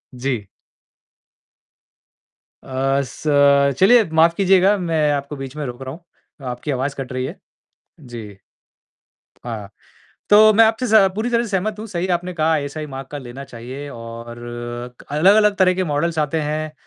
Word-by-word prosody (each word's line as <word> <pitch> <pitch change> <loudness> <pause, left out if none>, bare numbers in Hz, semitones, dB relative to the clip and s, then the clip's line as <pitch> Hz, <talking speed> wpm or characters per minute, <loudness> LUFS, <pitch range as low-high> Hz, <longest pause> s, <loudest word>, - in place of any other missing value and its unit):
जी। 125 -4 -3 2.2
अ, 135 +1 0
स 125 - -11 0.6
चलिए 230 +4 +6
माफ़ 165 +1 +5
कीजिएगा 195 +1 +4
मैं 165 -4 -1
आपको 140 0 -3
बीच 135 0 -7
में 150 -1 -4
रोक 125 0 -7
रहा 130 - -6
हूँ, 170 +3 -13 0.5
आपकी 125 +4 -4
आवाज़ 135 +2 -2
कट 135 -2 -6
रही 130 0 -2
है 160 +9 -7 0.6
जी, 115 -7 -9 1.1
हाँ, 110 -4 -6 0.6
तो 215 +1 +8
मैं 225 +2 +7
आपसे 225 +3 +1
स 215 -4 +5
पूरी 220 +4 -2
तरह 235 0 +1
सहमत 210 +1 -2
हूँ, 220 - -6
सही 185 -3 -3
आपने 180 +1 -7
कहा 160 -1 +1
आईएसआई 150 0 -2
मार्क 135 -2 -8
का 145 - -5
लेना 130 +1 -9
चाहिए 130 +3 -8
और 115 0 -9 0.7
अलग-अलग 200 +8 +4
तरह 185 -1 +4
के 185 0 -1
मॉडल्स 160 +2 -1
आते 155 +1 0
हैं 155 +1 -3
150 Hz, 155 wpm, -20 LUFS, 130-190 Hz, 2.2 s, तो